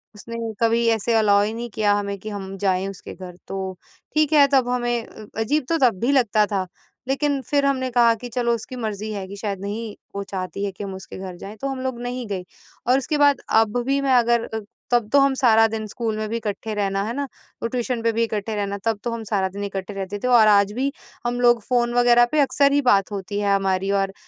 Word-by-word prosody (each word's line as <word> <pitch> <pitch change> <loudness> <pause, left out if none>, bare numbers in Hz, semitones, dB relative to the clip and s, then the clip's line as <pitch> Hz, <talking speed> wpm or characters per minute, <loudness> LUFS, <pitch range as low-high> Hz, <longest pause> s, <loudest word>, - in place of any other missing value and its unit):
उसने 230 +3 -8 0.2
कभी 230 +1 +3
ऐसे 225 +1 +1
अलाउ 205 -2 +4
ही 215 +2 -2
नहीं 235 +1 -5
किया 210 -1 +2
हमें 200 -1 -2
कि 215 - -7
हम 195 -2 -6
जाए 190 -1 +1
उसके 195 -2 -8
घर 180 -2 -9
तो 195 - -4 0.6
ठीक 310 0 +3
है 290 -2 +7
तब 260 -2 +4
हमें 240 -2 0
अ, 215 - -12
अजीब 285 +6 +1
तो 330 - +2
तब 225 -7 +2
भी 245 +4 +2
लगता 230 -6 +3
था, 200 -3 -2 0.4
लेकिन 275 +1 0
फिर 285 -1 +2
हमने 260 -2 +1
कहा 235 -1 +5
कि 245 - -6
चलो 240 -1 +1
उसकी 230 +3 -8
मर्ज़ी 215 -3 -4
है 195 -2 -5
कि 200 - -8
शायद 200 -3 -3
नहीं 210 +2 -5 0.2
वो 200 - -2
चाहती 195 +1 -4
है 200 - -2
कि 190 - -8
हम 195 -1 -5
उसके 190 - -9
घर 185 -1 -6
जाएँ, 200 +4 -9
तो 275 - -3
हम 270 -1 -3
लोग 260 -2 -3
नहीं 245 0 -4
गए। 195 -3 -3 0.4
और 255 - +5
उसके 295 +3 -1
बाद 285 -1 +4
अब 220 +1 +3
भी 275 +1 +1
मैं 270 -1 +2
अगर 235 -1 +3
अ, 220 - -4 0.3
तब 240 -3 +3
तो 285 - +7
हम 275 0 +4
सारा 225 -4 +5
दिन 220 0 -4
स्कूल 220 0 -3
में 215 0 -2
भी 230 - -1
इकट्ठे 215 0 -4
रहना 195 -1 0
है 220 +3 -3
ना, 285 +3 -2 0.4
वो - - +1
ट्यूशन 245 0 -2
पे 230 0 +2
भी 230 +1 +1
इकट्ठे 220 -1 -2
रहना 200 -1 -2
तब 225 -2 +1
तो 240 - -2
हम 230 -1 -4
सारा 200 -3 0
दिन 200 +2 -6
इकट्ठे 195 0 -4
रहते 195 +1 -5
थे - - +1
और 235 -3 +6
आज 200 -1 +5
भी 265 +4 -1 0.3
हम 240 0 -1
लोग 240 -1 +5
फोन 240 0 +1
वगैरह 240 0 +5
पे 305 - +2
अक्सर 280 0 +3
ही 285 0 +3
बात 200 -6 +3
होती 200 0 -4
है 200 -1 +2
हमारी 195 0 0
और 195 -1 0
225 Hz, 245 wpm, -23 LUFS, 200-245 Hz, 0.6 s, है